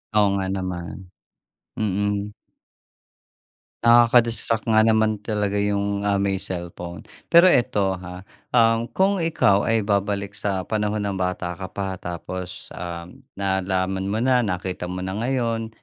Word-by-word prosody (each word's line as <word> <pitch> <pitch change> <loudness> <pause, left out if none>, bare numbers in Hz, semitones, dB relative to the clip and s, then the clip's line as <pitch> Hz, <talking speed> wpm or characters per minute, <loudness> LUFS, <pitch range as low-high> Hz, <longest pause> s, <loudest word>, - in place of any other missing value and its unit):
Oo 105 -1 +5
nga 95 - -2
naman. 95 -1 -5 0.7
Mm. 100 0 -1 1.5
Nakaka-distract 115 -1 +4
nga 110 -1 +4
naman 110 -1 +2
talaga 105 -2 -1
yung, 100 0 0
ah, 100 0 +1
may 100 -1 0
cellphone. 85 -1 -6 0.2
Pero 170 +2 +7
eto 105 - +3
ha, 90 +1 -9 0.2
um, 115 -1 +3
kung 195 0 +1
ikaw 105 -13 +2
ay 115 -2 +2
babalik 100 -1 -1
sa 100 -2 -2
panahon 105 +1 -1
na 100 - -1
bata 90 -1 -2
ka 95 +2 -7
pa, 95 -1 -4
tapos, 90 +1 -7
um, 85 +8 -7 0.2
nalaman 95 0 -1
mo 105 - -1
na, 125 +2 +3
nakita 90 -3 -3
mo 90 0 -4
na 95 - -3
ngayon, 115 -3 -1
100 Hz, 135 wpm, -23 LUFS, 95-110 Hz, 1.5 s, Pero